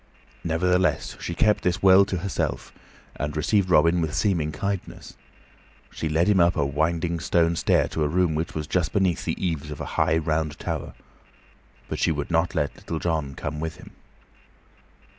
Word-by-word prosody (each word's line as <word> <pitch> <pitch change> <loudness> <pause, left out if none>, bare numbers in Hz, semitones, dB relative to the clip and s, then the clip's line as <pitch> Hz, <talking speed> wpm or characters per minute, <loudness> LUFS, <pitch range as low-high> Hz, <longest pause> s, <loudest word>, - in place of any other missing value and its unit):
Nevertheless, 90 +2 +1
she 85 - -4
kept 105 +3 +2
this 90 0 0
well 95 +1 +7
to 95 -2 -3
herself 95 +2 -3 0.4
and 75 +3 -3
received 95 +5 +1
Robin 85 +1 +4
with 80 -2 -2
seeming 85 -7 +1
kindness. 100 +4 -5 0.8
She 80 - -3
led 80 +3 +2
him 105 -2 +4
up 85 +1 +4
the 75 -4 +1
winding 80 +4 -1
stone 85 0 +2
stair - - +2
to 80 - -1
a - - +2
room 85 +1 +1
which 80 +2 -3
was 75 -1 -3
just 85 +1 -1
beneath 95 -4 +1
the - - -2
eaves 80 -5 -2
of 75 - -7
a - - -4 0.2
high, 80 0 +3
round 80 -2 -1
tower; - - -5 0.9
but - - -4
she - - +2
would 75 +1 -3
not 80 +2 +1
let 70 - -1
Little 80 - -5
John 80 -5 -2
come 75 0 -5
with 80 0 -4
him. - - -14
80 Hz, 180 wpm, -25 LUFS, 75-90 Hz, 0.9 s, well